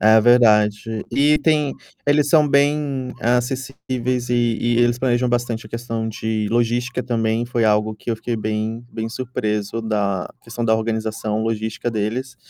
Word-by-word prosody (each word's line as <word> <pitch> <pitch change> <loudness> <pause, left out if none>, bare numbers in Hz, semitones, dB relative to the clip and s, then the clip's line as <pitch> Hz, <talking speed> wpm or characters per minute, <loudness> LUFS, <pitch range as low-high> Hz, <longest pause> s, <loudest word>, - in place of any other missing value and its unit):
É 110 +1 +6
verdade. 110 -2 +3
E 150 +2 +3
tem, 150 -3 +2 0.3
eles 145 0 +3
são 155 -1 +5
bem 140 -2 +1
acessíveis 125 0 -1
e 120 -1 +2
e 120 0 +1
eles 120 0 +3
planejam 125 -1 +1
bastante 120 -2 -1
a - - -13
questão 115 -1 -3
de 110 -1 -2
logística 120 +1 0
também, 115 -1 0
foi 120 -1 0
algo 105 0 +2
que 110 - -6
eu 115 - 0
fiquei 115 +1 -3
bem 110 +2 -3
bem 110 0 -3
surpreso 115 -3 -3
da 100 -4 -1
questão 120 0 -5
da 110 -1 +3
organização 110 -1 -2
logística 110 +1 -2
deles. 115 +4 -3
115 Hz, 155 wpm, -21 LUFS, 110-125 Hz, 0.3 s, É